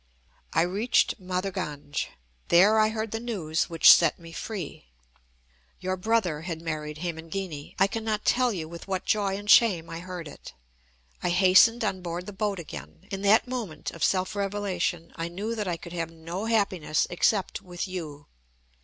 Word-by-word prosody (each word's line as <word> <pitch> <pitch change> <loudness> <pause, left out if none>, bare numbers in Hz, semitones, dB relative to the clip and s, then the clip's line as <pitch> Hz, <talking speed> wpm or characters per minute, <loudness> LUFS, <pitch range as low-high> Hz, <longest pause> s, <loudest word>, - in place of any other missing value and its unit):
I 165 - +3
reached 205 +6 +1
Mathurganj. 180 -6 -3 0.4
There 205 +6 +6
I 215 0 +4
heard 220 0 -3
the 225 - -2
news 185 -10 -2
which 165 -1 +9
set 165 -3 +3
me 165 -1 -12
free. 175 - -6 0.9
Your 185 0 -2
brother 185 -6 0
had 165 -1 -5
married 155 -2 -4
Hemangini. 165 -2 -5
I 195 - +5
cannot 215 +1 -2
tell 250 -1 +3
you 165 -6 -4
with 170 +2 -10
what 190 -1 -2
joy 200 -2 +1
and 205 +1 -9
shame 200 -7 +5
I 165 - -5
heard 180 -2 -7
it. 145 - -11 0.7
I - - 0
hastened 190 +6 +5
on 190 -3 -1
board 175 0 -4
the 205 - -8
boat 200 0 -1
again. 75 - -9
In 195 0 -3
that 205 +5 +4
moment 225 -12 -4
of 165 - -6
self 185 +2 +1
revelation 195 -4 -2
I 165 - -2
knew 200 +7 -4
that 210 -3 -3
I 175 -2 -1
could 170 0 -10
have 165 -2 -2
no 165 +5 -6
happiness 195 -9 +1
except 190 +2 +1
with 175 +1 -5
you. 155 -6 -6
185 Hz, 170 wpm, -27 LUFS, 165-205 Hz, 0.9 s, which